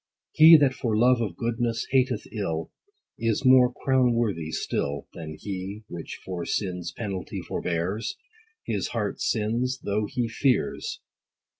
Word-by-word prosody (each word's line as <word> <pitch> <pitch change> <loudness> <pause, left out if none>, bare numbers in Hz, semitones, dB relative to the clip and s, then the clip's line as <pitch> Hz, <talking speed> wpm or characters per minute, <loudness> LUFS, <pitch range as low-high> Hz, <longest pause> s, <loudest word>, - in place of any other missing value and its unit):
He 160 +1 +9
that 140 -3 +3
for 115 -5 -1
love 125 +1 +4
of 100 -7 -3
goodness 115 0 -1
hateth 130 -1 +2
ill, 80 -7 -3 0.5
Is 115 +3 0
more 130 -1 +7
crown 130 -1 +2
worthy 100 -10 -1
still, 70 -2 -2
Than 80 -2 -7
he, 100 +3 -5
which 85 -2 -7
for 90 -2 -4
sin's 90 -4 -2
penalty 100 -5 -5
forbears; 90 +6 -2 0.5
80 - - -1
His - - -2
heart - - -3
sins, 120 +4 0
though 105 +1 0
he 120 +2 -1
fears. 125 +3 0
110 Hz, 140 wpm, -26 LUFS, 90-125 Hz, 0.5 s, He